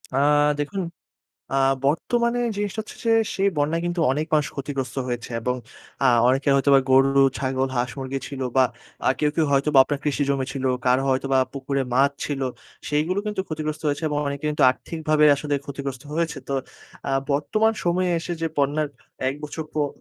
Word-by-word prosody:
আ - - +1 0.4
দেখুন 190 +7 -2 0.7
আ - - +2 0.3
বর্তমানে 235 - +1 0.2
জিনিসটা 205 +1 -2
হচ্ছে - - -12
যে, - - +2 0.3
সেই 195 +1 +2
বন্যায় 155 +3 +1
কিন্তু 175 0 -2
অনেক 150 +3 -1
মানুষ 150 -1 +3
ক্ষতিগ্রস্ত 135 -1 -4
হয়েছে, 120 -2 -4
এবং 125 +2 0 0.5
আ - - +3 0.2
অনেকে 135 +3 +2
হয়তো 140 +1 +2
বা - - +7
গরু, 135 +1 +5 0.2
ছাগল 130 0 0
হাঁস 120 0 0
মুরগি 135 0 -3
ছিল, 140 -2 -7 0.2
বা 130 - +7 0.4
আ - - +6
কেউ, 150 - +3
কেউ 160 - +3
হয়তোবা 140 +1 +2
আপনার 145 +1 -3
কৃষি 145 -1 0
জমি 135 -1 +1
ছিল, 135 -1 -3 0.2
কারো 125 +1 +4
হয়তোবা 135 0 +1 0.2
পুকুরে 140 0 -2
মাছ 135 +3 +4
ছিল। 140 -2 -3 0.5
সেগুলো 155 +6 +1
কিন্তু 210 -2 -1
ক্ষতিগ্রস্ত 155 -1 -4
হয়েছে, 145 +2 -1
এবং 150 - -1
অনেকে 140 +1 -4
কিন্তু 150 - -2
আর্থিকভাবে 155 +2 0
আসলে 145 +1 -3
ক্ষতিগ্রস্ত 140 -2 -6
হয়েছে। 165 -2 -1
তো 140 - -2 0.6
আ - - 0 0.2
বর্তমান 150 +11 +2
সময়ে 180 +1 +1
এসে 175 +1 -4
যে, - - +1
বন্যার 145 +2 +1 0.4
এক 135 - -4
বছর 150 +2 -5
পর 150 -1 +1
145 Hz, 175 wpm, -23 LUFS, 135-155 Hz, 0.7 s, বা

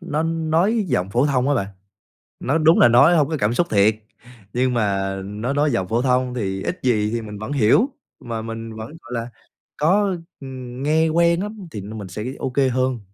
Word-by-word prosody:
nó 160 -3 -2
nói 165 +7 +1
giọng 95 -7 0
phổ 125 +6 +2
thông 135 -2 +1
á 145 - +3
bạn. 100 -7 0 0.7
Nó 145 +5 0
đúng 160 +1 +4
là - - +8
nói 125 +9 +6
hông 150 -3 +3
có 160 - -1
cảm 105 +3 +1
xúc 175 +6 +1
thiệt, 105 +1 +4 0.6
nhưng 125 +1 +1
mà 100 -4 0
nó 105 +7 -3
nói 145 0 +2
giọng 95 -6 -1
phổ 115 +5 0
thông 125 -1 +1
thì 95 -5 -3
ít 180 - -3
gì 110 -4 +1
thì 115 0 -2
mình 105 -1 -8
vẫn 110 +5 -6
hiểu, 140 - +3 0.3
mà 115 -2 -5
mình 115 0 -7
vẫn, 110 0 -6
gọi 125 - -10
là, 115 0 -3 0.5
có, 190 +5 +2 0.2
ừm, 130 -2 -8
nghe 160 +2 +3
quen 170 +2 +2
lắm 210 -3 -7
thì 105 - -6
như 105 +3 -8
mình 100 -3 -6
sẽ 95 +4 -6 0.2
OK 130 0 -4 0.2
hơn. 130 -1 0
125 Hz, 210 wpm, -21 LUFS, 110-155 Hz, 0.7 s, là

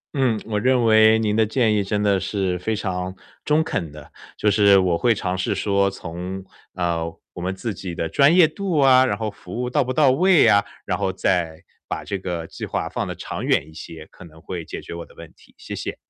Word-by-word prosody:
嗯， 125 -6 +1
我 105 -2 -2
认 125 +1 +2
为 110 0 +6
您 105 -2 0
的 110 - +4
建 110 0 +1
议 105 -1 +1
真 105 +1 -1
的 100 -2 +2
是 95 -1 -2
非 110 +4 -2
常 95 -2 -4 0.3
中 150 +1 +3
肯 85 - -3
的， 75 -1 -13 0.3
就 105 - +2
是 100 -1 +5
我 90 -3 +2
会 115 +4 +2
尝 90 -1 -2
试 90 - -1
说 100 -1 +1
从， 90 +1 -7 0.3
呃， 85 -2 -1 0.3
我 90 - -8
们 95 +2 -3
自 110 +2 -4
己 90 -2 -7
的 80 - -2
专 140 - +4
业 180 -3 +7
度 175 +1 -3
啊， 130 -2 +6
然 100 -5 -1
后 110 -1 -3
服 100 +3 -9
务 125 - -1
到 - - +2
不 125 - -3
到 140 -1 +4
位 180 +4 +4
啊， 100 0 +5 0.2
然 - - -1
后 95 - 0
再， 85 -4 -1 0.3
把 - - -4
这 100 -1 -4
个 90 -3 -4
计 - - -10
划 - - -2
放 - - -3
得 - - -5
长 - - -6
远 75 - +1
一 80 - -15
些， 80 -1 -10
可 - - -14
能 80 -1 -15
会 85 +1 -6
解 - - -7
决 - - -9
我 85 - -6
的 - - -19
问 - - -12
题， - - -24
谢 - - -8
谢。 - - -5
100 Hz, 255 characters per minute, -22 LUFS, 90-115 Hz, 0.3 s, 业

